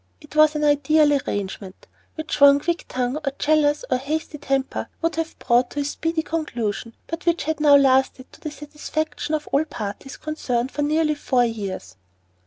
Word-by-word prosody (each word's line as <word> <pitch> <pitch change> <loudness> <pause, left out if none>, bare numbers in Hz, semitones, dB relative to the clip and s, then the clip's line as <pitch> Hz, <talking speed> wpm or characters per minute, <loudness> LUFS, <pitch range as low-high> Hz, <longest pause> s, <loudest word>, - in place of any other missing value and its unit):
It 300 -1 -15
was 310 0 +5
an 300 - -1
ideal 295 +1 +4
arrangement, 200 -7 -4 0.3
which 315 -2 -4
one 280 0 +8
quick 340 +4 -2
tongue 255 +2 -1
or 300 -3 -2
jealous 300 +5 +2
or - - +3
hasty 300 +3 -4
temper 270 -1 -2
would 330 0 -1
have 325 0 -3
brought 245 0 +2
to 290 - -2
speedy 320 +3 -2
conclusion, 235 -9 -3
but 330 +2 -6
which 340 0 +2
had 315 0 -2
now 295 -1 +6
lasted 265 -1 +2
to - - -17
the 310 - -4
satisfaction 300 +1 -4
of 300 - -5
all 280 +3 +3
parties 265 -2 -7
concerned 260 -5 -2
for 295 - -3
nearly 305 +1 +2
four 255 -4 +1
years. 195 - -5
290 Hz, 175 wpm, -23 LUFS, 255-310 Hz, 0.3 s, one